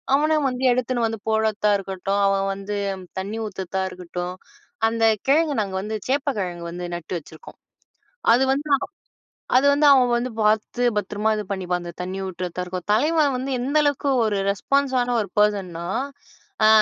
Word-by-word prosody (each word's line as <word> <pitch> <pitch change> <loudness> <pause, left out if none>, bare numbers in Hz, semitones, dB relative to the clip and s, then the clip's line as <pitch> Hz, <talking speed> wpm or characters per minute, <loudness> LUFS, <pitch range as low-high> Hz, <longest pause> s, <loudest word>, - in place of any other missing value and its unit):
அவனா 310 +2 +2
வந்து 250 +1 -4
எடுத்துன்னு 245 -1 0
வந்து 225 -1 -4
போடத்த 220 -1 +1
இருக்கட்டும், 195 +1 -2
அவன் 195 0 +1
வந்து 200 +1 -5 0.4
தண்ணீ 205 +4 -4
ஊத்தத்தா 190 -1 -4
இருக்கட்டும். 180 0 -5 0.5
அந்த 225 0 -2 0.2
கிழங்கு 300 +2 +3
நாங்க 195 -2 -4
வந்து 215 +2 -4
சேப்பக்கிழங்கு 210 - -1
வந்து 175 0 -5
நட்டு 170 +1 -8
வச்சிருக்கோம். 160 +1 -14 0.7
அது 250 +3 +5
வந்து 290 +3 -1 0.9
அது 270 - +3
வந்து 295 +1 +3
அவன் 255 -3 +5
வந்து 245 +2 -2
பாத்து 215 +3 +1
பத்ரமா 205 +2 -1
இது 210 - -3
பண்ணிப்பான். 180 -2 -2
அந்த 170 0 -7
தண்ணி 185 +2 -4
ஊற்றத்தா 180 -1 -4
இருக்கும், 180 -1 -6
தலைவன் 295 +2 +2
வந்து 265 +2 -3
எந்த 275 +5 0
அளவுக்கு 285 -1 +1 0.2
ஒரு 210 -2 0
ரெஸ்பான்ஸான 255 +3 +1
ஒரு 200 - -5
பெர்சன்னா, 190 -5 +1 0.8
அ - - +7
210 Hz, 150 wpm, -23 LUFS, 190-255 Hz, 0.9 s, அ